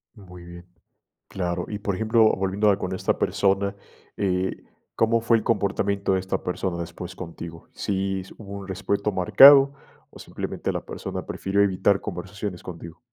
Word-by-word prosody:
Muy 90 -4 -13
bien, 85 0 -12 0.6
claro. 90 -2 -3
Y, 105 - -4
por 100 -1 -2
ejemplo, 110 +3 +3
volviendo 95 +2 +1
a 100 - +2
con 95 0 -3
esta 95 - -1
persona, 100 0 +1 0.4
eh, 95 -1 0 0.4
¿cómo 115 +1 +3
fue 115 0 +3
el 110 - -2
comportamiento 100 -2 0
de 95 - +1
esta 95 0 -3
persona 90 0 -3
después 85 +2 -7
contigo? 85 -2 -9
¿Si 95 -1 -2
s 95 - -12
hubo 100 -3 -10
un 100 -1 -9
respeto 100 +2 -1
marcado, 135 +9 +8 0.4
o - - -14
simplemente - - -4
la - - -4
persona - - -6
prefirió 95 +1 -1
evitar 100 0 +2
conversaciones 100 0 -6
contigo? 85 -1 -9
95 Hz, 160 wpm, -24 LUFS, 90-100 Hz, 0.6 s, marcado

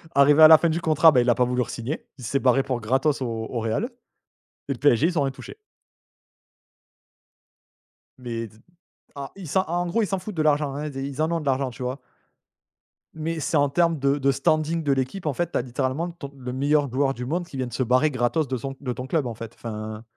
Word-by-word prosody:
Arrivé 145 +2 +6
à - - +12
la 160 0 +9
fin 170 - +1
du 165 +2 -1
contrat, 160 0 +5
bah, 130 -4 +4
il 120 - +1
a 120 - +4
pas 125 - +2
voulu 125 0 0
re-signer. 120 +6 -5
Il - - -10
s'est 140 +4 0
barré 135 0 +3
pour 130 -3 -2
gratos 135 +6 +1
au 130 - -1 0.2
au 120 - -3
Réal 115 - -1 0.8
et - - 0
le 130 - -5
PSG 145 +1 +4
ils 175 -2 -1
ont - - +3
rien 135 -1 -1
touché. 135 - -11 2.6
Mais 115 -2 -5
d 105 - -20 0.6
ah, 140 -1 -7
ils 195 -3 -9
s'en 185 +6 +1
en 175 0 -2
gros 200 +7 0
ils - - -1
s'en 190 +1 -2
foutent 205 +2 -8
de 160 - 0
l'argent, 145 -2 +2
hein, 150 +2 -4
ils 140 -3 -7
é 135 - -3
ils 140 +1 -4
en 160 +1 +1
ont 170 - 0
de 150 - -8
l'argent, 135 -1 0
tu 115 - -12
vois? 125 +3 -3 1.1
Mais 160 +1 -3
c'est 155 +1 0
en 145 0 +3
termes 165 +2 +2
de 140 +1 +2
de 140 -1 +2
standing 155 +4 0
de 145 - +1
l'équipe 135 +8 -2
en 150 - 0
fait, 175 +5 -2
tu - - 0
as - - +1
littéralement 130 +7 -2
ton 155 -5 -9
le 125 -1 -6
meilleur 140 +1 +1
joueur 135 +1 +1
du 125 -1 -6
monde 175 +7 -2
qui 145 - -9
vient 130 -1 -2
de 120 - -10
se 130 - 0
barrer 130 +5 +3
gratos 130 +4 0
de 130 0 -2
son 135 +3 -6
de 125 -3 -3
ton 125 +1 -7
club 150 0 0
en 120 - -3
fait 115 0 -8
enfin 110 -1 -6
140 Hz, 245 wpm, -24 LUFS, 125-155 Hz, 2.6 s, à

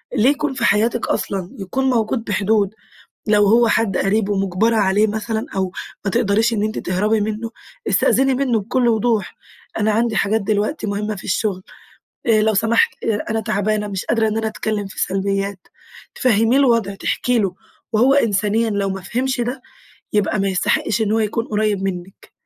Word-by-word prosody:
ليه 240 +2 +4
يكون 295 0 0
في 260 -3 -1
حياتِك 230 +3 +2
أصلًا! 190 -3 -2
يكون 230 +8 -2
موجود 230 -1 0
بحدود، 205 0 +1 0.5
لو 210 -1 +4
هو 230 +3 +5
حد 225 -4 +1
قريب 205 +1 +1
ومجبرة 195 +3 +1
عليه 205 0 +3
مثلًا 220 +1 -3
أو 190 -1 -1 0.3
ما 195 - 0
تقدريش 225 +1 +2
أنتِ 215 0 -1
تهربي 210 +4 0
منه، 220 +2 -3 0.4
استأذني 270 0 +3
منه 250 -4 +1
بكل 240 +4 0
وضوح 225 -2 0 0.4
أنا 215 0 +2
عندي 225 +1 +1
حاجات 215 +2 +1
دلوقتي 210 +6 -1
مهمة 210 +1 -2
في 190 - -10
الشغل 190 -2 -1 0.6
آآ، 220 -2 +4
لو 220 0 +2
سمحت 225 +3 +1
أنا 225 0 -1
تعبانة، 210 0 -1
مش 195 -2 -4
قادرة 225 -1 +1
إن 215 0 -1
أنا 225 0 -1
أتكلم 215 -1 -3
في 195 - -10
سلبيات، 195 0 -2 0.5
تفهمّيه 225 0 +3
الوضع 230 -7 +2
تحكي 245 +4 0
له 195 -4 -1 0.4
وهو 245 +5 +4
إنسانيًا 220 -3 +1
لو 200 -2 -1
ما 190 0 -4
فهمش 250 +6 -2
ده، 250 +2 -3 0.5
يبقى 210 0 +1
ما 195 - +1
يستحقش 195 +3 0
إن 215 -1 0
هو 225 - +2
يكون 220 +1 -1
قريب 210 -2 0
منِك. 190 0 -6
215 Hz, 165 wpm, -20 LUFS, 200-230 Hz, 0.6 s, هو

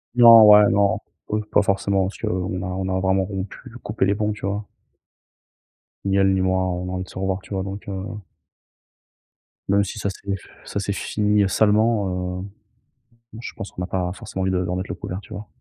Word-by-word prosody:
Non 115 -2 +9
ouais, 105 0 +8
non, 100 0 +2 0.3
peu 105 - -1
pas 105 0 +3
forcément 100 0 +1
parce 100 - -8
qu'on 90 0 -2
a - - -4
on 95 +1 -3
a 95 0 0
vraiment 95 0 +2
rompu, 95 0 -5 0.2
coupé 105 -1 -2
les 100 - +2
ponts, 105 0 -1
tu 105 - -7
vois? 100 +1 -2 1.4
Ni 100 0 +2
elle 95 0 +4
ni 95 - +1
moi, 95 0 +1
on 90 0 -3
a - - -4
envie 95 0 -3
de - - -17
se - - -11
revoir, 95 0 -1
tu - - -9
vois? 95 - -1
Donc, 100 +1 -7
heu 95 -1 -4 1.6
Même 100 +1 +4
si 100 +2 -6
ça 100 - -1
c'est 100 0 -4
f 95 - -13 0.2
ça - - -3
c'est 100 0 -2
fini, 105 +1 +1
heu, 95 - +2
salement, 100 -4 +1
heu, - - -6 0.9
bon 115 - -9
je - - -7
pense 100 - -7
qu'on - - -7
n'a 90 - -2
pas 90 -2 -2
forcément 95 0 -6
envie 95 - +1
de 95 - +1
de - - -4
remettre 90 +1 -3
le - - -3
couvert, 90 - -6
tu - - -12
vois? 105 - -7
95 Hz, 225 wpm, -22 LUFS, 95-105 Hz, 1.6 s, Non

